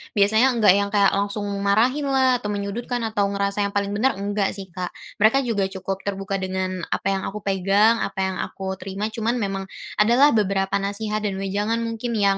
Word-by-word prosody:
biasanya 220 +5 +4
enggak 215 -5 +6
yang 200 +1 +2
kayak 200 -1 +3
langsung 200 +1 -1 0.2
marahin 240 +9 +2
lah 260 -2 +3
atau 210 - -5
menyudutkan 210 +4 -3
atau 210 -3 0
ngerasa 200 0 -1
yang 200 - -10
paling 200 0 0
benar 225 +6 +1
enggak 200 0 -1
sih 190 -3 -8
Kak, 180 0 -5 0.2
mereka 245 +6 +4
juga 205 -5 0
cukup 190 0 -5
terbuka 195 0 -2
dengan 185 0 -3
apa 195 - -1
yang 195 -1 -2
aku 210 +1 -6
pegang 200 +4 +3
apa - - -3
yang 190 0 -2
aku 190 -1 -5
terima 195 +3 -4
cuman 230 +2 -1
memang 195 -4 -2 0.4
ada 220 +3 +4
lah 285 +3 +6
beberapa 195 -2 +1
nasihat 210 +2 -2
dan 205 -2 -2
wejangan 205 +4 -1
mungkin 230 +1 -3
yang, 200 -2 +3
200 Hz, 195 wpm, -23 LUFS, 195-225 Hz, 0.4 s, enggak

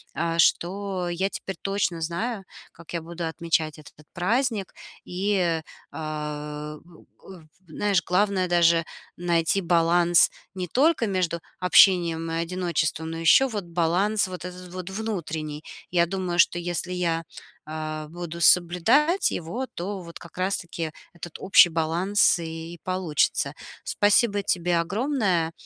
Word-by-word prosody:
э, 165 +2 -1
что 185 +2 +1
я 185 +3 -1
теперь 190 -1 -6
точно 195 -4 -1
знаю, 195 +7 -3 0.3
как 170 0 -14
я 170 - -2
буду 170 +1 -6
отмечать 160 -1 -1
этот 150 0 -16
праздник. 215 +2 -1 0.3
И, 180 -3 0 0.3
э, 150 -1 -5
у 170 -2 -18 0.2
у 190 -3 -11 0.3
знаешь, 195 +4 0
главное 185 0 +1
даже 170 -1 +3 0.3
найти 170 +1 +1
баланс 170 0 +4 0.2
не 185 -2 -4
только 270 - +2
между 180 -4 -1 0.2
общением 175 -3 +4
и 165 - -2
одиночеством, 165 -2 -1
но 165 - -5
ещё 165 +11 +5
вот 215 -5 -4
баланс 180 +5 +1
вот 180 -1 -7
этот 180 0 -9
вот 185 0 -6
внутренний. 165 -8 -4 0.3
Я 170 -1 +3
думаю, 180 -1 -3
что 175 0 +4
если 175 +1 -3
я, 170 -2 -1 0.4
э, 155 0 -5
буду 170 0 -7
соблюдать 180 - +4
его, 200 +11 -4
то 195 +2 -5
вот 170 -1 -11
как 170 -1 -14
раз-таки 175 -3 -2 0.2
этот 170 -1 -9
общий 190 -2 +6
баланс 170 +6 +2
и 165 0 -7
получится. 185 -5 0 0.3
Спасибо 205 0 +2
тебе 175 -2 +1
огромное 195 - 0
175 Hz, 130 wpm, -25 LUFS, 165-190 Hz, 0.4 s, общий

